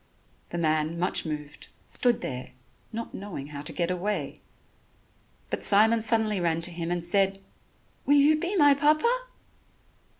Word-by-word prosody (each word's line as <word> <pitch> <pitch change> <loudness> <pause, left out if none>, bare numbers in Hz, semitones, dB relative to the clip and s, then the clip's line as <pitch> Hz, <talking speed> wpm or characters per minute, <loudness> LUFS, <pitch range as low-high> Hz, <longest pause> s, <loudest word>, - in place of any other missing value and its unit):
The 175 - -5
man, 155 0 0
much 175 -1 +1
moved, 150 -1 -7 0.2
stood 245 -2 +2
there, 125 -1 -6 0.4
not 230 +1 -6
knowing 175 -8 -7
how 145 -1 -7
to - - -5
get 175 0 -2
away. 195 +4 -3 1.1
But - - -2
Simon 220 +3 +4
suddenly 220 -2 +2
ran 165 -1 0
to 175 - -3
him 170 0 -5
and 175 -1 -2
said: 195 +2 +1 0.7
"Will 290 - +5
you 300 +2 +4
be 355 +5 -2
my 290 -5 +6
Papa?" 310 - +1
195 Hz, 145 wpm, -26 LUFS, 165-240 Hz, 1.1 s, my